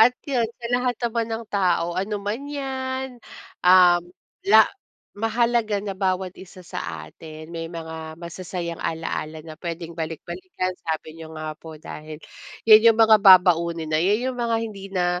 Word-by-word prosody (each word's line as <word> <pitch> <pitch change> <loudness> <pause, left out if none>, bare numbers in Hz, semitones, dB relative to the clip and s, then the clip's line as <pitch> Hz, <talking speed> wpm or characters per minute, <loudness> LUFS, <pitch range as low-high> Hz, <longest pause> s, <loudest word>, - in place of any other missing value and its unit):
at 245 +3 +6
yun 245 -6 0
sa 235 0 -9
lahat 245 -1 +1
naman 230 -1 0
ng 225 +1 -4
tao 175 -3 +1
ano 195 +4 -2
man 215 +8 -4
yan, 265 -3 -4 0.4
um, 180 -1 +6 0.5
la 220 +1 +8 0.5
mahalaga 225 -1 +1
na 200 -1 -3
bawat 185 -1 0
isa 185 -1 -13
sa 80 - -6
atin 155 - -11
may 165 0 -5
mga 160 -1 -7
masasayang 170 0 -6
alaala 160 -1 -4
na 155 -1 -10
puwedeng 170 -1 -5
balik-balikan. 185 - -4 0.2
Sabi 160 0 -4
niyo 160 0 -9
nga 155 0 -4
po, 160 -1 -10
dahil 155 0 -9 0.5
yun 215 -1 +9
yung 225 -1 +7
mga 220 -1 +7
babaunin 170 -4 +5
na 155 - +3
yun 210 +9 +1
yung 250 - -10
mga 230 -1 +1
hindi 200 -3 -7
na, 180 -1 +1
185 Hz, 160 wpm, -23 LUFS, 165-225 Hz, 0.5 s, yun